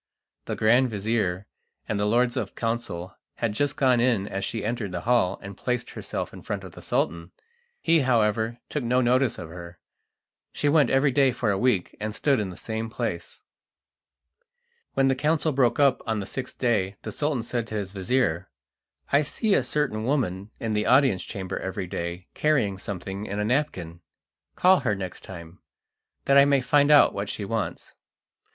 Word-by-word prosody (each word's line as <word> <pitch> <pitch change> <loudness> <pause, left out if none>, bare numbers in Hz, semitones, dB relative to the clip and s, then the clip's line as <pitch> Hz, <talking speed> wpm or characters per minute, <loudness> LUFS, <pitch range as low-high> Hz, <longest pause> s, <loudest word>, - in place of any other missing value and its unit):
The - - -3
grand 120 +4 +4
vizir 105 -3 -1 0.4
and 105 - -1
the 105 - +1
lords 120 +2 +2
of 110 -7 -3
council 115 -7 -3 0.2
had 115 -3 -1
just 145 +5 0
gone 130 -3 +4
in 115 -5 +2
as 95 0 -4
she 115 - -3
entered 115 -3 -2
the 90 -1 -4
hall 120 -4 +2
and 100 0 -8
placed 125 +3 -3
herself - - -5
in - - -10
front - - -4
of - - -9
the - - -12
Sultan. 85 0 -1 0.5
He, 165 0 +3
however, 115 -3 +1
took 150 - -3
no 125 +2 +2
notice 125 0 +2
of 80 - -7
her. 85 0 -10 0.7
She 145 - -1
went 150 0 +4
every 135 +1 +3
day 135 0 +4
for 120 -3 0
a 100 - 0
week, 120 -8 +1
and 105 0 -4
stood 140 -3 +2
in 105 -3 -2
the 90 - -9
same 110 0 -4
place. 115 - -4 1.5
When 135 - +3
the 135 - +4
council 155 +4 +1
broke 125 -3 +2
up 140 -3 +4
on 110 -1 0
the 100 - -4
sixth 130 +4 -6
day 105 -6 +1
the 110 - -5
Sultan 145 0 -1
said 120 -1 -3
to 110 - -6
his 100 -3 -3
vizir: 95 -3 0 0.6
"I 140 - +5
see 200 +8 0
a - - +4
certain 125 -4 -1
woman 110 -7 -1
in 110 -1 -2
the 105 0 0
audience 130 -8 +4
chamber 95 -1 -5
every 95 0 -4
day 85 +1 -5
carrying 125 -11 +1
something 95 +1 -5
in 100 - -4
a 105 - 0
napkin. 95 - -1 0.5
Call 185 +1 +5
her 115 -6 0
next 95 -3 -7
time, 85 -1 -10 0.7
that 140 +1 +6
I 140 - +7
may 140 -1 +4
find 145 +3 +3
out 150 -1 +7
what 100 +1 -4
she 105 - -4
wants." 110 +1 -4
115 Hz, 185 wpm, -26 LUFS, 100-130 Hz, 1.5 s, I